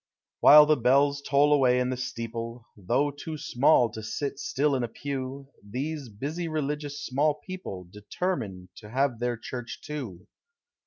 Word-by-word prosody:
While 150 0 +9
the 155 0 +3
bells 140 +3 +3
toll 145 +1 +3
away 125 -3 +4
in 125 0 0
the - - -1
steeple, 115 -1 -5
Though 120 +9 0
too 155 +2 -7
small 125 -2 +3
to 110 - -7
sit 135 +6 -4
still 145 +1 0
in 130 - -1
a - - -1
pew, 135 +2 -5
These 135 +6 -4
busy 145 +11 -4
religious 150 -2 -3
small 145 +3 +1
people 150 - -7
Determine 105 - -4
to 105 - -11
have 130 -1 0
their 120 -1 -1
church 120 0 -7
too. 120 - -6
135 Hz, 155 wpm, -27 LUFS, 115-145 Hz, -, While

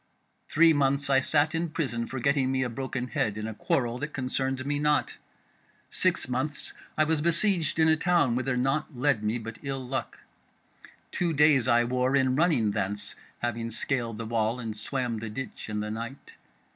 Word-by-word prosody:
Three 165 +1 +5
months 140 0 +1
I 135 - +6
sat 145 +3 +1
in 165 +1 -1
prison 120 -7 -2
for 130 - -5
getting 135 0 +2
me 130 -1 +1
a 125 - -2
broken 125 0 -4
head 110 -2 -1
in 110 - -4
a 110 - -4
quarrel 120 +2 -1
that 150 +1 -5
concerned 130 0 -2
me 145 0 -1
not. 150 0 +1 0.8
Six - - +1
months 130 +4 -3 0.2
was 155 0 +2
I - - -3
besieged 170 0 +3
in 160 -1 +4
a 160 - +5
town 170 -6 +2
whither 125 +1 -1
naught 135 +2 -1
led 135 -3 +2
me 105 +3 0
but 115 0 -8
ill 135 -2 -4
luck. 130 -2 -4 0.9
Two 175 -2 0
days 150 -4 +4
I 120 -1 +4
wore 125 +2 +1
in 130 -1 +3
running 145 -9 +2
thence, 100 +1 -1 0.3
having 115 -1 -2
scaled 115 -1 -1
the 115 - -5
wall 115 +1 0
and 110 -3 -5
swam 120 +1 -3
the 110 0 -5
ditch 130 +1 -7
in 105 0 -2
the 105 0 -4
night. 115 +5 -7
130 Hz, 185 wpm, -27 LUFS, 115-145 Hz, 0.9 s, I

